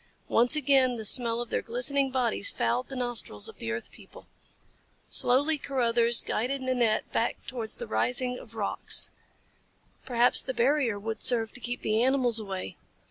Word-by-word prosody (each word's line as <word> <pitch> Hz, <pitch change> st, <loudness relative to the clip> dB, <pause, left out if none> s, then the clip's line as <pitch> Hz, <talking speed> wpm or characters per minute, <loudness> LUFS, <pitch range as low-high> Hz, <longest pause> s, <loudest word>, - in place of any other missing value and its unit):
Once 245 Hz, +5 st, +4 dB
again 270 Hz, -3 st, +2 dB
the 220 Hz, -2 st, -6 dB
smell 230 Hz, +1 st, +4 dB
of 240 Hz, -, -8 dB
their -, -, -1 dB
glistening 270 Hz, +3 st, -1 dB
bodies 255 Hz, -, 0 dB
fouled 255 Hz, -, -2 dB
the 270 Hz, -, -8 dB
nostrils 240 Hz, -, -1 dB
of -, -, -9 dB
the 115 Hz, -, -4 dB
earth 115 Hz, +1 st, -6 dB
people. -, -, -16 dB, 0.8 s
Slowly 285 Hz, +5 st, +2 dB
Carruthers 235 Hz, -4 st, 0 dB
guided 255 Hz, +5 st, -2 dB
Nanette 245 Hz, -4 st, 0 dB
back -, -, -2 dB
towards 235 Hz, -4 st, -5 dB
the 480 Hz, -, -6 dB
ring 250 Hz, -, -2 dB
of 225 Hz, -1 st, -15 dB
rocks 210 Hz, -3 st, +3 dB, 0.9 s
perhaps 245 Hz, -1 st, +3 dB
the 260 Hz, -, -5 dB
barrier 255 Hz, -3 st, +1 dB
would 220 Hz, +1 st, -6 dB
serve 225 Hz, -3 st, +3 dB
to -, -, -4 dB
keep 245 Hz, 0 st, -6 dB
the 215 Hz, +1 st, +1 dB
animals 250 Hz, -3 st, +2 dB
away. 190 Hz, -, -7 dB
245 Hz, 160 wpm, -27 LUFS, 225-260 Hz, 0.9 s, Once